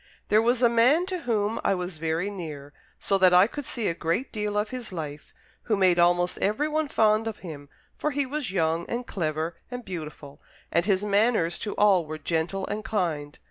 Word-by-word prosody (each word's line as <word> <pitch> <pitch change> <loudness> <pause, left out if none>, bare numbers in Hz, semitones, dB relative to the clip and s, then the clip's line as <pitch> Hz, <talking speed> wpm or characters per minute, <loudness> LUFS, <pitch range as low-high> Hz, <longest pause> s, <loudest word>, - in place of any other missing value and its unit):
"There 215 +1 +5
was 240 +2 +2
a - - +8
man 245 +9 +4
to 370 -1 -3
whom 220 -5 -1
I - - +2
was 180 -3 -5
very 165 +5 -1
near, 150 -7 -7 0.2
so 195 -1 +1
that 185 -1 +6
I 180 +2 +8
could 285 +5 -6
see 230 -4 -2
a - - +1
great 170 +10 -2
deal 210 -2 -2
of 210 +1 0
his 250 -4 -6
life, 150 -4 -6 0.3
who 215 -3 +1
made 185 -2 +4
almost 175 +1 +3
everyone 300 +8 0
fond 220 -4 +2
of 220 -2 -4
him, 145 -4 -8 0.3
for 300 - 0
he 285 -1 -1
was 280 -4 -3
young, 165 -2 0
and 245 +1 -3
clever, 160 -3 -3
and 245 -1 -6
beautiful, 155 -5 -8 0.3
and 170 +3 +1
his 195 -1 +2
manners 205 -4 +2
to 210 - -4
all 190 -6 +4
were 155 0 -5
gentle 165 +5 -2
and 210 +1 -4
kind. 160 -9 -2
195 Hz, 200 wpm, -26 LUFS, 165-230 Hz, 0.3 s, a